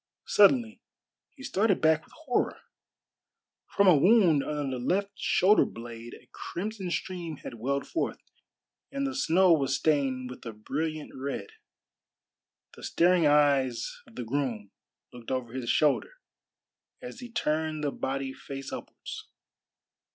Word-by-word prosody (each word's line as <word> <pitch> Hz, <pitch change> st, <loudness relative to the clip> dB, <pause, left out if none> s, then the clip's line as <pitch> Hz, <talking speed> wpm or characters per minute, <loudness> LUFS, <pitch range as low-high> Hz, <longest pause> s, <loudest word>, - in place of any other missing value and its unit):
Suddenly 230 Hz, +2 st, +4 dB, 0.5 s
he 270 Hz, -, -15 dB
started 220 Hz, -7 st, +1 dB
back 160 Hz, 0 st, +3 dB
with -, -, -22 dB
horror. 250 Hz, -, 0 dB, 1.1 s
From 200 Hz, -, +2 dB
a 180 Hz, -, +8 dB
wound 175 Hz, -3 st, +5 dB
under 140 Hz, -4 st, -3 dB
the -, -, -6 dB
left 200 Hz, +7 st, 0 dB
shoulder 200 Hz, +1 st, +4 dB
blade 115 Hz, 0 st, -8 dB
a -, -, -18 dB
crimson 195 Hz, +1 st, -5 dB
stream 170 Hz, -3 st, -4 dB
had -, -, -8 dB
welled 140 Hz, +4 st, -1 dB
forth, 330 Hz, -, -2 dB, 0.7 s
and 275 Hz, 0 st, -2 dB
the 270 Hz, -, -2 dB
snow 185 Hz, -, +4 dB
was 135 Hz, -4 st, +1 dB
stained 135 Hz, -4 st, 0 dB
with 125 Hz, -, -11 dB
a 115 Hz, -, -6 dB
brilliant 155 Hz, +8 st, -4 dB
red. 140 Hz, -, -5 dB, 1.2 s
The -, -, -13 dB
staring 175 Hz, -2 st, +3 dB
eyes 140 Hz, -4 st, +2 dB
of 115 Hz, -, -18 dB
the 125 Hz, -, -4 dB
groom 115 Hz, -5 st, -2 dB, 0.4 s
looked 120 Hz, -2 st, -10 dB
over 125 Hz, -3 st, -3 dB
his 130 Hz, -3 st, -4 dB
shoulder 150 Hz, -, +2 dB, 0.9 s
as 250 Hz, -1 st, -9 dB
he 245 Hz, -1 st, -8 dB
turned 155 Hz, -7 st, -1 dB
the 145 Hz, -, 0 dB
body 135 Hz, 0 st, -3 dB
face 135 Hz, 0 st, -8 dB
upwards. -, -, -8 dB
150 Hz, 135 wpm, -28 LUFS, 130-190 Hz, 1.2 s, a